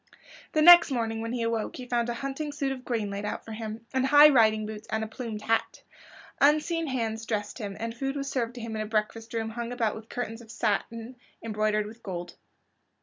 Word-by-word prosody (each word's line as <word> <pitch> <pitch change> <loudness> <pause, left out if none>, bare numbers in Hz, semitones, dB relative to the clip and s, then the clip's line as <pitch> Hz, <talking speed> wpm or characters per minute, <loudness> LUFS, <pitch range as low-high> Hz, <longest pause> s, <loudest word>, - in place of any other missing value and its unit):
The 310 - +3
next 345 0 +10
morning 225 -4 -1
when 230 0 -3
he 240 -1 -2
awoke 230 -1 -1
he 255 - -7
found 240 -1 0
a 240 - -2
hunting 275 +4 -4
suit 280 -2 -2
of 260 -1 -6
green 225 -5 -2
laid 200 +1 -4
out 210 - -4
for 225 - -9
him, 220 +1 -6
and 260 0 +2
high 295 +2 +9
riding 220 -5 +4
boots 215 0 -8
and 220 0 -1
a - - -3
plumed 220 -1 -6
hat. 225 0 0 0.6
Unseen 310 +3 +3
hands 225 -4 -2
dressed 210 0 -3
him, 200 -3 -5
and 230 0 -4
food 270 +3 -3
was 280 -1 -3
served 245 -3 -2
to 245 - -7
him 225 -1 -5
in 215 - -2
a 215 - -3
breakfast 220 +1 -2
room 225 -1 -2
hung 235 +1 -5
about 230 -4 0
with 220 0 -10
curtains 235 -2 -4
of 225 - -15
satin 230 +2 -2 0.3
embroidered 215 -1 0
with 225 +2 -11
gold. 175 -4 -6
230 Hz, 220 wpm, -28 LUFS, 220-255 Hz, 0.6 s, next